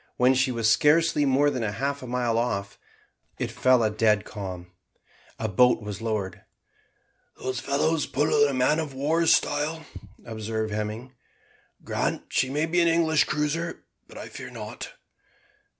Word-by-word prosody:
When 125 +1 +4
she 130 0 +2
was 115 -2 0
scarcely 150 +6 +4
more 140 +2 +3
than 130 - -3
half 135 +7 -2
a 130 - -8
mile 120 -2 0
off, 100 -5 -3 0.6
it - - -3
fell 130 -2 +3
a 110 - +1
dead 105 -1 +2
calm. 90 -3 -7 0.7
A 110 - -2
boat 115 +3 +3
was 105 0 -6
lowered. 105 -5 -3 1.0
"Those 130 -1 -3
fellows 145 +4 0
pull 145 +1 +2
in 135 -2 -2
man 130 +5 +3
of 150 -4 -4
war's 160 +4 +2
style," 155 +2 +1 0.4
observed 110 -1 -4
Hemming. 110 +4 -4 0.7
"Grant - - -2
she 130 - +1
may 150 +3 0
be 175 +2 +1
an 170 - +3
English 165 -2 +3
cruiser: 155 +3 -2 0.2
but - - -13
I - - -7
fear - - -9
not." - - -8
130 Hz, 150 wpm, -26 LUFS, 110-150 Hz, 1.0 s, When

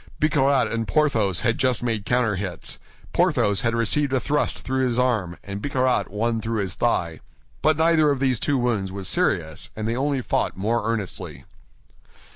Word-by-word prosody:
Bicarat 140 -4 +3
and 115 -1 -2
Porthos 115 - +2
had 115 - 0
just 130 -3 +1
made 110 -4 -2
counterhits. 100 -8 -1 0.3
Porthos 100 -1 +2
had 115 -1 0
received 125 +5 +1
a 130 - +3
thrust 145 +4 -1
through 130 0 -1
his 120 -2 0
arm, 110 -9 0
and 100 0 -6
Bicarat 130 -6 +1
one 115 +3 -1
through 115 -1 -1
his 95 -2 -3
thigh. 85 -9 0 0.4
But 155 -1 +3
neither 160 -1 +4
of 140 -2 0
these 130 -4 +1
two 145 - +1
wounds 115 -6 0
was 95 -1 -5
serious, 90 - 0
and 110 0 -3
they 115 - 0
only 140 +1 0
fought - - -1
more 110 +3 0
earnestly. 105 -6 -5
115 Hz, 170 wpm, -23 LUFS, 100-130 Hz, 0.4 s, neither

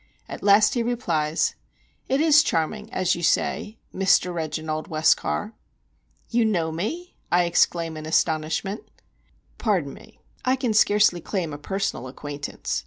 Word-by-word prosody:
At - - -8
last 205 +1 +5
he 240 - 0
replies: 170 -10 0 0.6
"It 270 - +2
is 305 -2 +6
charming, 210 - -2
as 185 -1 +1
you 175 - -4
say, 210 +5 0 0.2
Mr. 185 -1 +2
Reginald 155 -1 -4
Westcar." 160 +7 +1 0.8
"You 235 0 +3
know 175 -7 0
me?" 305 - -4 0.2
I 175 0 +4
exclaim, 170 -1 +1
in 155 0 -7
astonishment. 160 +5 0 0.8
"Pardon 185 - 0
me, - - -16 0.2
I 255 +1 +2
can 250 -4 -1
scarcely 205 -4 +4
claim 170 -6 -3
a 145 - -7
personal 190 -6 -3
acquaintance. 145 +2 -5
180 Hz, 135 wpm, -24 LUFS, 155-215 Hz, 0.8 s, is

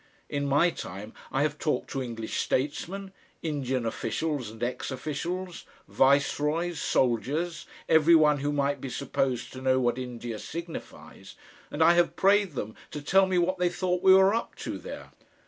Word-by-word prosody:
In 140 0 -2
my 145 +5 +4
time 100 - -8 0.2
I 135 - +1
have 150 0 -1
talked 155 - -1
to 135 - -2
English 115 -3 -4
statesmen, 185 +8 -2 0.3
Indian 135 -6 -1
officials 125 +3 -2
and 110 +2 -8
ex 125 +1 -2
officials, 170 +6 -4 0.2
viceroys, 150 +5 +2
soldiers, 140 +8 0 0.2
every 160 +1 +6
one 150 -2 +5
who 145 +1 -1
might 140 -1 0
be 135 - -5
supposed 130 -1 -2
to 130 - -8
know 130 0 +3
what 120 0 +1
India 120 -3 -5
signifies, 170 0 -8 0.3
and 160 - +1
I 170 - +7
have 175 0 +2
prayed 200 -2 +3
them 110 -4 -5
to 150 - -6
tell 190 +5 +4
me 185 -1 +1
what 180 +1 +1
they 180 -1 +3
thought 180 0 -1
we 190 0 +7
were 190 +1 +5
up 230 - -2
to - - -4
there. - - -9
145 Hz, 165 wpm, -28 LUFS, 130-175 Hz, 0.3 s, I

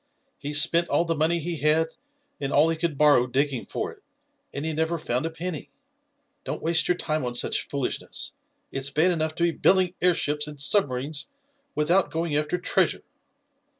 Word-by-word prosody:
He 145 - -5
spent 165 +3 +5
all 170 - +2
the 165 - 0
money 160 +2 +1
he 170 +1 -3
had 155 +2 +2 0.5
and 140 -1 -3
all 155 +3 +4
he 165 - 0
could 160 -3 -2
borrow 145 -4 +4
digging 135 0 -1
for - - -4
it, - - -18 0.5
and 140 +2 -4
he 160 - -1
never 160 +2 0
found 125 0 -2
a - - -3
penny. 165 -1 -5 0.7
Don't - - -4
waste 165 0 +1
your 180 - +1
time 155 -4 -2
on 120 -1 -3
such - - 0
foolishness. 140 -3 -3 0.4
It's 135 +1 -1
bad 160 +5 +3
enough 155 -2 0
to 170 - -1
be 170 - +3
building 185 +2 +2
airships 150 -4 +1
and 150 -1 -9
submarines 145 -3 +1 0.5
without 170 +3 +2
going 165 0 -2
after 150 +4 0
treasure." 180 - +1
155 Hz, 180 wpm, -25 LUFS, 145-170 Hz, 0.7 s, spent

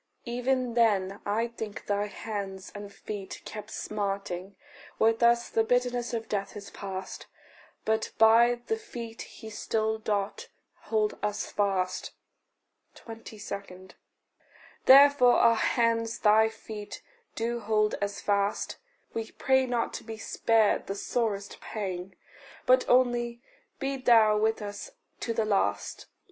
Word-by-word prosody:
Even 250 0 0
then, 205 -4 +2
I 220 +3 +1
think, 220 -3 -7
thy 205 0 0
hands 200 -2 -6
and 205 0 -8
feet 200 -1 -7
kept 210 0 -7
smarting: 195 -3 -4 0.4
With 225 +1 +3
us 235 0 +4
the 225 - +1
bitterness 245 0 0
of 225 -2 -3
death 200 0 -3
is 200 -1 -9
past, 190 -1 -6 0.6
But 220 0 +1
by 235 +2 +6
the 445 - -1
feet 235 - -8
he 220 -1 -10
still 220 +1 -1
doth 205 -2 -2 0.4
hold 215 -1 0
us 210 0 -2
fast. 195 -3 -1 0.8
22. 200 -4 -9 1.0
Therefore 275 -2 +8
our 230 - +6
hands 230 0 +1
thy 220 +1 +5
feet 215 -1 -9 0.3
do 235 +1 -1
hold 215 -1 +1
as 200 0 -2
fast. 200 0 0 0.4
We 225 -1 -3
pray 265 -1 +2
not 240 -2 -1
to - - -6
be 225 0 -7
spared 220 -1 +2
the 195 - -3
sorest 205 -2 -2
pang, 190 -3 -5 0.5
But 255 0 +4
only 240 -1 +3 0.4
be 270 0 -2
thou 225 -4 +5
with 220 0 +1
us 205 0 -6 0.3
to 230 - -2
the 225 -1 0
last. 100 - -1
220 Hz, 130 wpm, -28 LUFS, 205-235 Hz, 1.0 s, Therefore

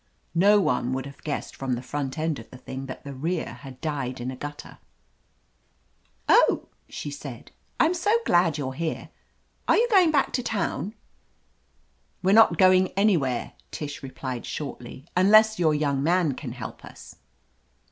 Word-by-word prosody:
No 200 +5 +5
one 125 -7 0
would 130 0 -3
have 140 0 -11
guessed 150 - -4
from 135 -2 -2
the 120 - -5
front 135 +1 -4
end 155 -3 -1
of 115 - -12
the 125 - -11
thing 130 +1 -7
that 130 - -8
the 140 - -7
rear 160 +6 -3
had 135 -2 -11
died 135 -5 -3
in 125 +2 -3
a - - -7
gutter. 145 +3 -8 1.5
"Oh!" - - +4 0.2
she 145 - -6
said. 140 -4 -9 0.3
"Oh, - - +6
I'm 330 - +2
so 360 +4 0
glad 170 -3 +3
you're 135 -3 -3
here! 160 +3 -4 0.6
Are - - +5
you 475 - +3
going 370 -5 +6
back 290 -3 +1
to 250 - 0
town?" 220 -2 -2 1.3
"We 190 - +3
are - - +5
not 225 +1 +6
going 185 -1 +5
anywhere," 165 - +1 0.2
Tish 145 -2 -6
replied 130 -2 -6
shortly, 135 -2 -7
"unless 215 +3 +5
your 160 -3 +3
young 140 -2 0
man 165 -1 +2
can 125 -2 -7
help 120 -4 -8
us." - - -13
150 Hz, 165 wpm, -25 LUFS, 130-185 Hz, 1.5 s, Oh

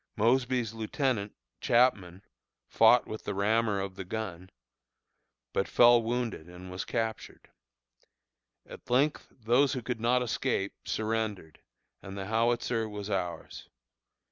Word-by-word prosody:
Mosby's 120 0 +1
lieutenant, 110 -1 -2 0.2
Chapman, 100 -7 +2 0.4
fought - - +5
with 110 - -7
the - - -4
rammer 105 +1 +1
of 95 0 -4
the 95 - -7
gun, 95 -3 -6 1.0
but 95 - 0
fell 120 0 +6
wounded 115 -7 -3
and 90 +1 -10
was 90 - -4
captured. 115 -2 -4 1.1
At - - -13
length 140 +5 +1
those 125 +4 +2
who 125 -3 -4
could 125 -3 -3
not 125 +2 +2
escape 120 -4 -1
surrendered, 110 -7 -3 0.4
and 95 0 -9
the 95 - -4
howitzer 115 +1 0
was 105 0 -6
ours. 90 -4 -4
110 Hz, 120 wpm, -29 LUFS, 100-120 Hz, 1.1 s, fell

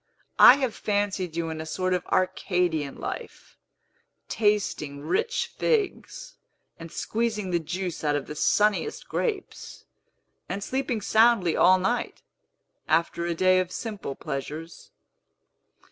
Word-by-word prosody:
I 250 - +10
have 260 -5 -1
fancied 200 -4 -2
you 165 -1 -2
in 160 0 -5
a - - -6
sort 185 +3 -1
of 180 0 -2
Arcadian 180 -5 0
life, - - -7 0.7
tasting 205 -10 0
rich 455 - 0
figs, 480 +3 -2 0.4
and 165 -1 -9
squeezing 220 -4 -2
the 175 - +2
juice 175 +2 -4
out 150 -1 +1
of 145 - -2
the - - -7
sunniest 210 - +1
grapes, 415 -5 -4 0.6
and 200 - -3
sleeping 255 -3 -2
soundly 220 -5 +3
all 185 +1 +6
night, 215 +7 -2 0.6
after 170 +2 +1
a 170 - -1
day 185 +2 +4
of 185 -1 -2
simple 210 - -5
pleasures." 155 +4 -6
185 Hz, 125 wpm, -26 LUFS, 165-220 Hz, 0.7 s, I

